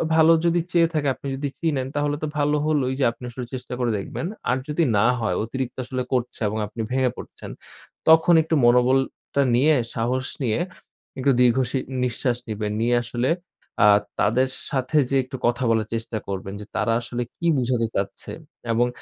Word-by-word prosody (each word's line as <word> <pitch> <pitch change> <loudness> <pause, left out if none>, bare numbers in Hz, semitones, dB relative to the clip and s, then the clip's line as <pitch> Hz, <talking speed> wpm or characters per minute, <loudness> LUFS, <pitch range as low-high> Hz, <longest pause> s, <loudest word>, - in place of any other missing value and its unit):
ভালো 160 0 +6
যদি 170 +1 +3
চেয়ে 170 -1 +4
থাকে 150 -3 0
আপনি 140 - -8
যদি 140 +1 -3
চিনেন 145 -6 0
তাহলে 145 0 0
তো - - 0
ভালো 150 +1 +2
হলোই 145 -4 +1
যে - - +3
আপনি 115 +2 -16
আসলে 125 0 -6
চেষ্টা 125 -1 -6
করে 120 -2 +1
দেখবেন। 130 - -4 0.2
আর 130 - +2
যদি 150 +3 +1
না 100 - +4
হয় 110 - 0
অতিরিক্ত 125 +2 -4
আসলে 130 0 -3
করছে 125 -1 -1
এবং 105 +2 -2
আপনি 110 +2 -6
ভেঙে 130 -1 +2
পড়ছেন। - - -9 0.6
তখন 160 +2 +6
একটু 160 0 0
মনোবলটা 130 +3 +2
নিয়ে 150 +5 +4 0.2
সাহস 125 +3 -1 0.2
নিয়ে 115 +3 +1 0.6
একটু 135 +1 +3
দীর্ঘ 120 0 +4
সি 135 - 0 0.3
নিঃশ্বাস 125 0 -1
নিবেন। 105 -1 -3
নিয়ে 120 +1 +2
আসলে 120 +2 -1 0.5
আ - - +8 0.3
তাদের 125 +5 +2 0.2
সাথে 135 +3 0
যেয়ে 135 -1 +2
একটু 130 0 -7
কথা 120 +1 +1
বলার 110 -1 +1
চেষ্টা 115 0 -4
করবেন 95 0 -4
যে - - -8
তারা 115 - +1
আসলে 120 +1 -4 0.2
কি 170 - -5
বুঝাতে 120 -2 +1
চাচ্ছে 100 0 -3 0.4
এবং 120 +2 +3
125 Hz, 180 wpm, -23 LUFS, 115-140 Hz, 0.6 s, আ